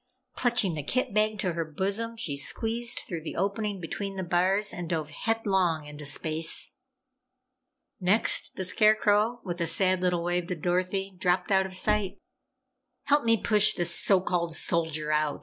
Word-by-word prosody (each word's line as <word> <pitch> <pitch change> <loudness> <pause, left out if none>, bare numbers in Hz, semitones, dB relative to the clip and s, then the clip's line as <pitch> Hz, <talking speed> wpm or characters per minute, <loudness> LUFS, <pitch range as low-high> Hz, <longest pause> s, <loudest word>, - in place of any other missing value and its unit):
Clutching 240 -7 +2
the 155 - -4
kit 245 - -2
bag 215 0 +1
to 185 -3 -1
her 165 0 -2
bosom, 200 +9 -3
she 170 -11 -2
squeezed 225 +11 0
through 170 -3 -5
the 155 - -7
opening 200 +1 -2
between 195 +3 -5
the 190 - -3
bars 185 +4 +1
and 175 -2 -6
dove 155 -3 -3
headlong 190 -5 0
into 150 0 -7
space! 160 +2 0 1.3
Next, 195 +4 +2
the 190 - -1
Scarecrow, 215 +3 +2
with 175 -2 -5
a 170 - +1
sad 185 +2 +2
little 180 -2 0
wave 175 0 -1
to 180 - -3
Dorothy, 185 +3 -2
dropped 180 +1 0
out 190 -1 +3
of 185 - -8
sight. 210 0 +1 0.9
"Help 290 -2 +2
me 230 0 +4
push 210 -1 +3
this 175 -1 0
so 195 -2 +3
called 170 -3 -1
Soldier 160 -3 -1
out!" 150 -1 0
185 Hz, 165 wpm, -27 LUFS, 170-210 Hz, 1.3 s, me